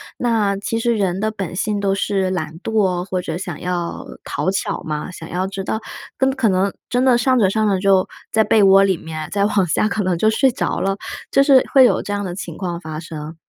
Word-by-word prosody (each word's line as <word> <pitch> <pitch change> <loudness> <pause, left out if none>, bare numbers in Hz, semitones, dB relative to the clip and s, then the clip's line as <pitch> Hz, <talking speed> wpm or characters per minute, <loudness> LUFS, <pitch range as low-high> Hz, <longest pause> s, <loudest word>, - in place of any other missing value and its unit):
那 220 -5 +1
其 225 +3 -3
实 235 0 +1
人 190 -2 0
的 215 +1 0
本 195 -5 -5
性 205 -1 -1
都 195 -1 +1
是 195 -1 0
懒 160 -3 -4
惰， 190 -5 +1
或 185 -1 -3
者 165 -2 -4
想 175 -5 -6
要 175 -1 -3 0.2
讨 185 - -2
巧 195 - -2
嘛， 150 +3 -4
想 160 -2 -10
要 185 +2 -1
知 195 0 -5
道 220 - -2 0.4
跟 265 0 +2
可 260 -4 0
能 190 +1 +1 0.2
真 250 +1 +1
的 250 -2 +5
上 255 +1 +2
着 200 -5 +4
上 215 +1 +1
着 195 -2 +2
就 190 -1 +3 0.2
在 220 0 +3
被 215 -2 +4
窝 195 0 +7
里 195 -2 +3
面， 155 -1 -7
再 200 0 0
往 200 -3 +2
下 215 +6 +1
可 210 - -1
能 180 -2 +1
就 215 +5 +3
睡 260 +5 +3
着 - - -2
了， 195 0 0 0.4
就 275 - +5
是 275 -2 +6
会 265 -2 +8
有 - - +3
这 205 - -4
样 205 0 -2
的 180 -2 -4
情 195 - -7
况 175 -3 -4
发 155 -2 -7
生， 160 -1 -8
195 Hz, 255 characters per minute, -20 LUFS, 180-220 Hz, 0.4 s, 会